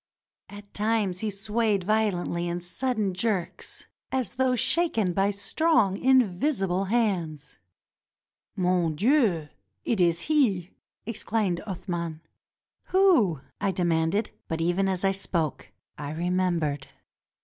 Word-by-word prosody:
At 205 0 -12
times 210 -4 0
he 220 - -1
swayed 210 0 0
violently 180 -4 0
in 175 +1 -2
sudden 210 +2 -1
jerks 190 -2 -3 0.3
as 260 -2 -1
though 260 0 +2
shaken 230 - +1
by 195 +2 +2
strong, 205 - +2
invisible 195 -5 +2
hands. 185 -9 -1 1.0
"Mon 180 -3 +1
dieu 220 - +3
1 150 - -15 0.4
it 225 -6 +1
is 170 -1 +3
he!" 215 - +1 0.3
exclaimed 215 -4 -1
Athman. 170 -4 -4 0.7
"Who?" 315 - +3 0.2
I 200 - 0
demanded; 175 +3 0 0.2
but 160 - -3
even 175 +4 +1
as 190 0 -1
I 195 - +4
spoke, 170 -5 -2 0.3
I 145 0 -4
remem 180 +1 0
bered. 145 -3 -2
195 Hz, 115 wpm, -26 LUFS, 175-225 Hz, 1.0 s, I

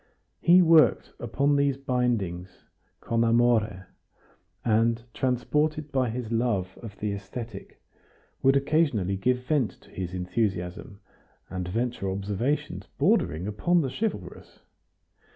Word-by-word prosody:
He 180 +1 +6
worked 165 -2 +4
upon 140 +5 +1
these 140 -1 +2
bindings 115 -10 -2 0.4
con 115 0 0
amore, 115 -4 +2 0.8
and, 115 0 +2
transported 150 +4 0
by 130 -3 +1
his 115 0 -5
love 115 -6 0
of 110 -4 -9
the 105 -1 -2
aesthetic, 105 +4 -8 0.6
would 135 +1 +4
occasionally 140 - +1
give 125 +5 0
vent 140 -6 0
to - - -20
his 90 -1 -5
enthusiasm, 90 +1 -3 0.5
and 90 -1 -4
venture 115 0 -2
observations 100 +9 -2
bordering 80 +5 +2
upon 170 - +1
the 135 -4 -2
chivalrous. 220 +6 -5
115 Hz, 115 wpm, -27 LUFS, 100-135 Hz, 0.8 s, He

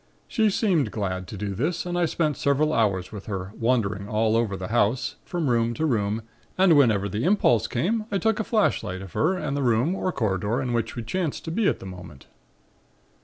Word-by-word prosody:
She 220 -4 +2
seemed 180 - +1
glad 95 -3 -3
to 105 - -7
do 100 0 -3
this 155 - -1
and 175 0 -3
I 175 -1 +2
spent 155 -2 0
several 145 +3 +1
hours 100 -7 +1
with 105 -2 -9
her, 95 -1 -4
wandering 105 -5 0
all 110 +1 +2
over 110 -4 0
the 95 -1 -6
house, 120 +4 +1
from 170 -4 -2
room 115 -1 +1
to 160 - -1
room 110 -5 0 0.3
and 185 -3 +5
whenever 110 -8 +4
the 105 +4 -3
impulse 130 - +3
came 215 - -1
I 200 - +1
took 220 +2 +1
a - - +1
flashlight 200 - 0
of 95 - -11
her 180 +5 +2
and 150 -5 -3
the 140 - -1
room 125 +6 +2
or 185 -1 -1
corridor 105 - -1
in 125 -2 -2
which 115 -1 -1
we 120 - -4
chanced 165 - -3
to 160 - -4
be 210 +4 +1
at - - +2
the - - -11
moment. 90 -7 -10
120 Hz, 215 wpm, -25 LUFS, 100-165 Hz, 0.3 s, and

